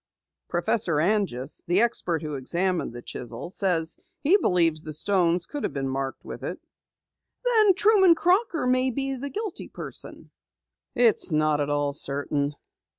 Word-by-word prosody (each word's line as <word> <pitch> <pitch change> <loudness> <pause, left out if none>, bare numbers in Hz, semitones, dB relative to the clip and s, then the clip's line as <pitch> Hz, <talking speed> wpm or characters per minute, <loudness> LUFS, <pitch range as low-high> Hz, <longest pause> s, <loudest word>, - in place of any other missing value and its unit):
"Professor 175 0 0
Anjus, 170 - 0
the 175 +3 +3
expert 175 -8 0
who 150 -1 -4
examined 175 +6 -1
the 120 0 -9
chisel, 120 +7 -7
says 175 -5 0 0.3
he 330 +7 +5
believes 170 - +2
the 155 -1 -6
stones 175 +1 +1
could 290 +7 -6
have - - -2
been 135 -1 -2
marked 135 0 -4
with - - -8
it." - - -4 0.9
"Then 435 -6 +5
Truman 385 -3 +5
Crocker 355 - +1
may 255 +1 +2
be 270 +2 -2
the 275 +2 -5
guilty 420 +2 -5
person!" - - -8 0.6
"It's 235 -7 +3
not 155 -1 +2
at 145 - -1
all 145 -1 0
certain. 145 0 -1
175 Hz, 150 wpm, -26 LUFS, -, 0.9 s, he